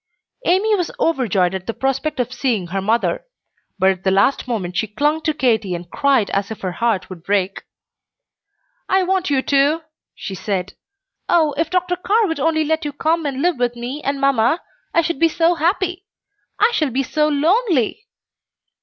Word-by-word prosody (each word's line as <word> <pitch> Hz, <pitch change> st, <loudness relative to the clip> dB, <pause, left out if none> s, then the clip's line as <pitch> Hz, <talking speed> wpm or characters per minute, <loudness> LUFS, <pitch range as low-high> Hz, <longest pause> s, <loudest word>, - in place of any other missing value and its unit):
Amy 400 Hz, +5 st, +3 dB
was 355 Hz, -4 st, -1 dB
overjoyed 205 Hz, -, +1 dB
at 190 Hz, -1 st, -5 dB
the 230 Hz, -, -3 dB
prospect 270 Hz, +2 st, -1 dB
of 250 Hz, 0 st, -1 dB
seeing 240 Hz, -7 st, -1 dB
her 190 Hz, +3 st, -3 dB
mother; 230 Hz, -, 0 dB, 0.5 s
but 190 Hz, 0 st, +4 dB
at 185 Hz, -1 st, -6 dB
the 190 Hz, -, +2 dB
last 200 Hz, +9 st, +2 dB
moment 190 Hz, -7 st, -3 dB
she 220 Hz, -, 0 dB
clung 295 Hz, +9 st, 0 dB
to 315 Hz, -, +1 dB
Katy 225 Hz, -10 st, +1 dB
and 175 Hz, 0 st, -9 dB
cried 270 Hz, -7 st, +2 dB
as 200 Hz, 0 st, -1 dB
if 220 Hz, -, -7 dB
her 185 Hz, -, -2 dB
heart 225 Hz, +1 st, 0 dB
would 185 Hz, -3 st, -10 dB
break. 195 Hz, -1 st, 0 dB, 1.3 s
"I 380 Hz, 0 st, +3 dB
want 375 Hz, -1 st, 0 dB
you 270 Hz, -2 st, +1 dB
too," 285 Hz, +3 st, +2 dB, 0.3 s
she 195 Hz, -, -6 dB
said. 190 Hz, -1 st, -3 dB, 0.6 s
"Oh, 315 Hz, -4 st, +3 dB
if 320 Hz, +2 st, -1 dB
Dr. 360 Hz, 0 st, 0 dB
Carr 425 Hz, +5 st, +2 dB
would 325 Hz, -5 st, -2 dB
only 315 Hz, +2 st, +2 dB
let 320 Hz, +2 st, 0 dB
you 295 Hz, -, -3 dB
come 320 Hz, +2 st, 0 dB
and 275 Hz, 0 st, -3 dB
live 350 Hz, -6 st, +1 dB
with 245 Hz, -1 st, 0 dB
me 245 Hz, +5 st, -5 dB
and 280 Hz, 0 st, -1 dB
mamma, 275 Hz, +2 st, +2 dB, 0.3 s
I 335 Hz, -, +3 dB
should 330 Hz, -3 st, -2 dB
be 330 Hz, -, +4 dB
so 330 Hz, +2 st, +2 dB
happy! 360 Hz, +3 st, -1 dB, 0.5 s
I 440 Hz, +3 st, +4 dB
shall 310 Hz, -10 st, +1 dB
be 265 Hz, +2 st, 0 dB
so 300 Hz, +4 st, +1 dB
lone 320 Hz, +11 st, +2 dB
ly!" 260 Hz, -, +1 dB
275 Hz, 190 wpm, -20 LUFS, 220-330 Hz, 1.3 s, but